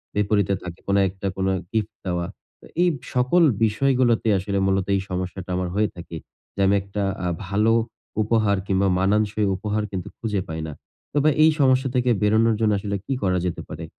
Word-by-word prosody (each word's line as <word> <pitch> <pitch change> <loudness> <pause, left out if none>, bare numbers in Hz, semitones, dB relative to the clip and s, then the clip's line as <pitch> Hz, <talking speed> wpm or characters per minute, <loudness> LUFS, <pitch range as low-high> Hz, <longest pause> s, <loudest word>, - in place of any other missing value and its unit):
বিপরীতে 100 -1 +2
থাকে 90 -1 -7
কোন 100 - +2
একটা 95 +1 -5
কোনো 95 0 +1 0.2
গিফট 110 -1 -1
দেওয়া। 90 -1 -1 0.4
তো, - - -15 0.2
এই 180 - +5 0.3
সকল 130 +8 +3 0.2
বিষয়গুলোতে 120 0 +2
আসলে 100 +1 -2
মূলত 95 -1 +1
এই 95 - 0
সমস্যাটা 90 0 -4
আমার 90 -1 -1
হয়ে 105 +1 +2
থাকে। 85 -1 -8 0.4
যে - - -9
আমি 100 - +4
একটা 100 +1 -4 0.2
আ - - +1 0.2
ভালো 105 +3 +2 0.5
উপহার 110 -2 +2
কিংবা 95 0 +2
মানানসই 105 +2 +1
উপহার 105 +2 -2
কিন্তু 95 -3 -4
খুঁজে 105 -4 -2
পাই 80 0 -4
না। 75 - -6 0.4
তবে 145 +1 +3
এই 160 - +7
সমস্যা 130 -1 +3
থেকে 125 0 +2
বেরোনোর 110 +2 +3
জন্য 110 -1 +2
আসলে 100 0 -3
কি 135 - -1
করা 90 -1 +2
যেতে 90 - -3
পারে? 80 +2 -6
100 Hz, 180 wpm, -23 LUFS, 95-110 Hz, 0.5 s, এই